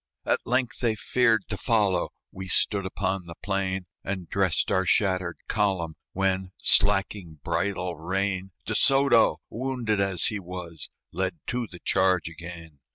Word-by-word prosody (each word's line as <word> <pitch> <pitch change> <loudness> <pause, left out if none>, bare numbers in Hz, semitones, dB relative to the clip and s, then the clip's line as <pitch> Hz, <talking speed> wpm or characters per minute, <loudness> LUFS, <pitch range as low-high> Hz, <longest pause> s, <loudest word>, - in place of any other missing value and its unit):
At - - 0
length 125 +1 0
they 115 -3 +1
feared 115 -2 +2
to 105 - -2
follow; 105 -6 +2 0.2
We 95 0 -7
stood 100 +1 +1
upon 95 -1 -2
the 85 - -8
plain, 95 -2 -1 0.2
And 95 -3 -4
dressed 95 -4 +1
our 95 -1 +3
shattered 90 -2 +1
column; 95 -6 0 0.2
When, 95 -1 0
slacking 95 -4 +2
bridle 90 +2 -1
rein, 95 +3 -1 0.2
De - - -2
Soto, 135 -4 +4
wounded 120 -4 -1
as 95 -3 0
he 105 - 0
was, 90 -3 -7 0.2
Led 95 0 -2
to 125 -2 -1
the 90 - -11
charge 95 -1 +2
again. 85 -2 -10
95 Hz, 145 wpm, -26 LUFS, 90-105 Hz, 0.2 s, Soto